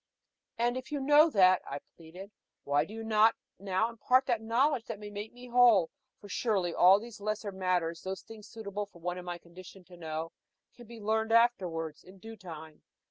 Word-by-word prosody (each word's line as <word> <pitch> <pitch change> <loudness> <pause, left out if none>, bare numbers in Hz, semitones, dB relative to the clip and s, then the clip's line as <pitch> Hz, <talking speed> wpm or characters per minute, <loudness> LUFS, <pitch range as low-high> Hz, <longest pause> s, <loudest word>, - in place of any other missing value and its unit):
"And 240 +2 0
if 255 +2 -8
you 290 - -2
know 295 +4 +5
that," 185 - +5
I 140 - -6 0.2
pleaded, 180 +5 -12 0.3
"why 145 +1 +1
do 205 - -12
you 225 - -6
not 220 0 +4 0.2
now 195 +2 0
impart 250 +3 +2
the 240 -4 0
knowledge 235 +3 +1
that 225 -3 -6
can 205 -1 -9
make 205 +2 -6
me 245 +1 -13
whole? 235 -8 +5 0.3
For 205 - -12
surely, 195 -4 -1
all 190 +3 +6
those 225 -1 -11
lesser 215 0 -3
matters 180 -3 -1
those 190 0 -6
things 220 -2 -12
suitable 205 -2 -6
for 195 - -19
one 175 +1 -4
in 180 - -10
my 175 -1 -4
condition 180 +2 -14
to 180 0 -16
know 160 0 -5 0.4
can 240 -2 -15
be 235 0 -11
learned 220 +1 -1
afterwards, 180 -10 +1
in 185 +1 -15
due 225 +3 -10
time. 160 -5 -11
205 Hz, 195 wpm, -30 LUFS, 180-230 Hz, 0.4 s, all